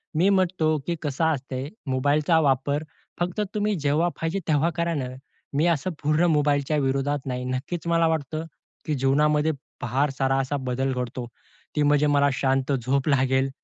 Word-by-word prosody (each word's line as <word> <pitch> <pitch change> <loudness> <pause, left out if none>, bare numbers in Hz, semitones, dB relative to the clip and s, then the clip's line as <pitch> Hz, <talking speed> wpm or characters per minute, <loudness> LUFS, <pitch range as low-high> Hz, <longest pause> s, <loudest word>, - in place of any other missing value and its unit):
मी 175 +5 +4
म्हणतो, 180 -5 +2
की 170 - 0
कसं 150 +2 0
असते 135 -3 -2 0.2
मोबाईलचा 145 +5 +2
वापर 140 +1 +1 0.4
फक्त 180 +4 -1
तुम्ही 210 0 +1
जेव्हा 150 +4 +2
पाहिजे 165 +4 -1
तेव्हा 155 +1 +3
करा 170 0 0
ना. 135 -4 -2 0.5
मी 145 +4 +2
असं 170 0 +1
पूर्ण 155 +3 +3
मोबाईलच्या 145 0 +1
विरोधात 140 0 0
नाही. 125 -1 -3
नक्कीच 135 +7 -4
मला 165 -1 +3
वाटतं, 160 0 -2 0.4
की 155 - -1
जीवनामध्ये 150 +3 +2 0.3
फार 135 +5 +1
सारा 135 0 +2
असा 135 +2 -1
बदल 135 +2 0
घडतो. 125 -1 -4 0.5
ती 150 - +2
म्हणजे 145 0 +3
मला 145 -1 +4
शांत 135 +1 0
झोप 130 +4 0
लागेल. 135 -1 +2
145 Hz, 160 wpm, -25 LUFS, 135-160 Hz, 0.5 s, मी